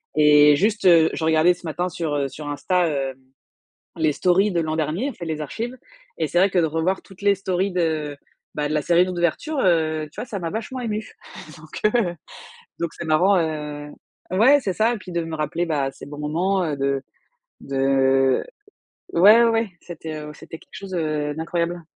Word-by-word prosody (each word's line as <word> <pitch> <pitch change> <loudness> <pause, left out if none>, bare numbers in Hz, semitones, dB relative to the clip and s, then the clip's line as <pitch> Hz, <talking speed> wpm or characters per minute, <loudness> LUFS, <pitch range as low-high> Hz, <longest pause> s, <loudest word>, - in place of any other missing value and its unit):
et 150 -1 +6
juste, 210 +2 0
heu, 165 -3 +6
je - - -4
regardais 160 +2 +4
ce 175 - -15
matin 175 +3 -2
sur, 160 -3 -3
heu, 140 -1 0
sur 150 +2 -9
Insta, 175 +5 0
hem, 135 -3 -2 0.8
les 155 -2 +1
stories 185 +6 +2
de 170 - +1
l'an 155 -1 -2
dernier, 165 - -1
en - - -8
fait, 170 - -8
les 155 -1 -3
archives 235 - -5 0.4
et 160 -2 0
c'est 175 - 0
vrai 195 +2 +4
que 185 - 0
de 165 - +3
revoir 165 +5 -1
toutes 190 0 -17
les 200 0 +4
stories 190 0 -1
de 160 -4 -1 0.4
bah, 150 0 -1
de 155 - -2
la 150 - +1
série 175 +3 +3
d'ouverture, 180 - -1
heu, 160 -3 +1
tu - - -8
vois, - - -5
ça 220 -4 -5
m'a 165 -1 -3
vachement 225 +5 -5
émue. 215 -3 -4 0.5
Donc 155 0 -10 0.2
heu, 185 -8 0 0.7
donc 170 -1 -3
c'est 170 - -7
marrant, 180 +5 +3
heu 150 -2 -4 0.4
ouais, 240 +10 +5
c'est 195 -6 -2
ça 220 +5 +2
et - - -4
puis, 190 -3 -11
de 170 -1 -1
me 165 -1 -5
rappeler, 155 +3 -2
bah, 140 -4 0
de - - -24
ces - - -10
bons 145 0 -9
moments, 180 +6 0
heu, 155 -3 -2
de 140 0 0 0.6
de 135 -1 +2 0.7
ouais, 210 +7 +7
ouais, 230 - +4
ouais, 225 -2 0
c'était, 160 -2 -7
heu, 150 0 -8
c'était 160 - -10
quelque - - -23
chose, 195 -1 -8
heu, 150 -3 -1
d'incroyable. 170 +2 -2
165 Hz, 205 wpm, -22 LUFS, 150-190 Hz, 0.8 s, ouais